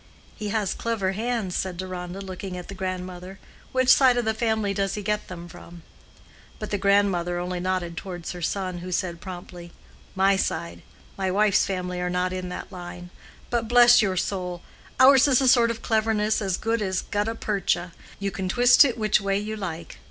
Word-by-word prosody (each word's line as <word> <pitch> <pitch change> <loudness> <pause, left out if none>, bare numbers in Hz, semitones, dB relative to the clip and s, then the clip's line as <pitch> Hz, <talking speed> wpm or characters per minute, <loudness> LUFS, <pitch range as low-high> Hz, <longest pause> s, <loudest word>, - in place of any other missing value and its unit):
"He 210 -1 -5
has 210 -2 0
clever 220 -5 -1
hands," 220 -2 -2
said 185 -2 -2
Deronda, 185 0 -6
looking 190 -1 -6
at 180 - -9
the - - -6
grandmother. 185 0 -5 0.3
"Which 260 -1 +1
side 255 -3 +6
of 240 - 0
the 220 - +1
family 220 -2 0
does 195 -1 -1
he 210 - -5
get 210 +1 -1
them 175 -1 -8
from?" 170 0 -13 0.7
But 215 - -6
the 205 - -1
grandmother 195 -3 +2
only 180 0 -3
nodded 180 -2 -2
towards 175 -2 -6
her 180 - -8
son, 185 +1 -2
who 180 +1 -7
said 175 -1 -2
promptly, 175 -2 -9 0.4
"My 195 +1 +3
side. 85 - -3 0.4
My 190 -1 0
wife's 205 +1 +3
family 180 -2 -3
are 180 - -1
not 180 +1 -1
in 185 -1 -4
that 180 - -7
line. 175 -1 -9 0.4
But 235 -2 0
bless 240 0 +7
your 190 -3 0
soul! 180 -1 -3 0.4
ours 265 +1 +7
is 260 -3 +4
a 265 - +2
sort 240 -2 +5
of 230 -1 -5
cleverness 220 -1 +1
as 190 -3 -1
good 225 0 -1
as 190 -2 -1
gutta 210 +2 -2
percha; 195 -5 -1 0.3
you 200 0 -3
can 190 -1 -4
twist 245 +6 +6
it 255 -5 0
which 215 -2 +2
way 195 0 0
you 210 +2 -4
like. 170 -5 -6
195 Hz, 190 wpm, -25 LUFS, 180-215 Hz, 0.7 s, bless